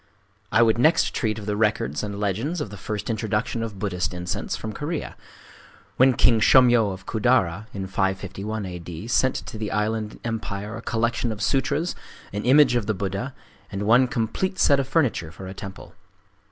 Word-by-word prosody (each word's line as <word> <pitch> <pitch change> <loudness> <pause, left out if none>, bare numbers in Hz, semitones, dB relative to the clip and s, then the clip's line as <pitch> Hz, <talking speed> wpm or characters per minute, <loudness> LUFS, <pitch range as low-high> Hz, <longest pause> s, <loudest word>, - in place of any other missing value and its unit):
I 115 - +5
would 115 0 +3
next 155 +6 +4
treat 110 -3 -1
of 105 - -7
the 105 0 -1
records 105 - 0
and 100 -1 -5
legends 110 - -1
of 115 -9 -4
the - - -7
first 105 +1 -5
introduction 110 0 -1
of 110 -3 -5
Buddhist 90 -3 -2
incense 90 -1 -3
from 110 -1 -6
Korea,—when 145 -3 -3
King 115 -1 +4
Shōmyō 120 -3 +5
of 95 +1 -9
Kudara, 110 -4 +1
in 95 -1 -5
551 100 +2 -2
A. 90 -1 -6
D., 85 +4 -8
sent 130 +2 +2
to 110 - -6
the 105 -1 -3
island 105 +1 -1
empire 110 -2 -4
a 115 - -7
collection 115 +1 0
of 105 - -6
sutras, 145 +7 0 0.4
an 105 - -3
image 130 0 +6
of 115 -4 0
the 110 - 0
Buddha, 100 +7 -3 0.4
and 100 0 -3
one 120 +5 +5
complete 125 - -2
set 140 -6 +4
of 135 - -1
furniture 130 - +1
for 90 +3 -10
a 95 - -6
temple. 95 0 -9
110 Hz, 180 wpm, -24 LUFS, 100-120 Hz, 0.4 s, image